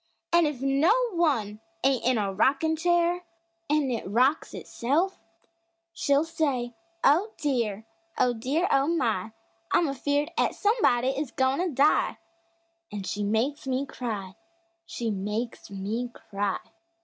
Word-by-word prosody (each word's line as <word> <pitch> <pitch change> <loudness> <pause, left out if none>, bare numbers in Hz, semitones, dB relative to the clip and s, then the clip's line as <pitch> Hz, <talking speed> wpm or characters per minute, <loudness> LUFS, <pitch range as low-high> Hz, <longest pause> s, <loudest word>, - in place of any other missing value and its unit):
An' 340 -2 +5
if 275 -3 -4
no 275 +9 +4 0.2
one 265 - 0 0.2
ain't 270 -2 +2
in 255 0 +2
a 200 -2 -1
rockin' 275 +10 +2
chair 345 +1 +2 0.5
An' 295 -3 +2
it 230 - -2
rocks 255 +8 +2
itself, 315 +11 -1 0.7
she'll 285 -3 +2
say: 280 -7 -1 0.3
"Oh, 360 +10 +4
dear! 235 -8 -1 0.3
Oh, 245 - +3
dear! 275 +10 0
Oh, 275 +1 +3
my! 225 - 0 0.4
I'm 340 - +3
afeared 285 +3 -1
'at - - +1
somebody 400 - +2
is 270 +1 -2
goin' 265 +3 +1
to 360 0 +1
die!" 285 +1 +2 0.7
An' 205 -1 -5
she 205 +2 -3
makes 235 +8 0
me 265 +1 0
cry 210 -8 -5 0.5
She 235 -7 -3
makes 210 +4 -4
me 210 +5 -3
cry! 200 -4 -3
265 Hz, 135 wpm, -27 LUFS, 225-305 Hz, 0.7 s, An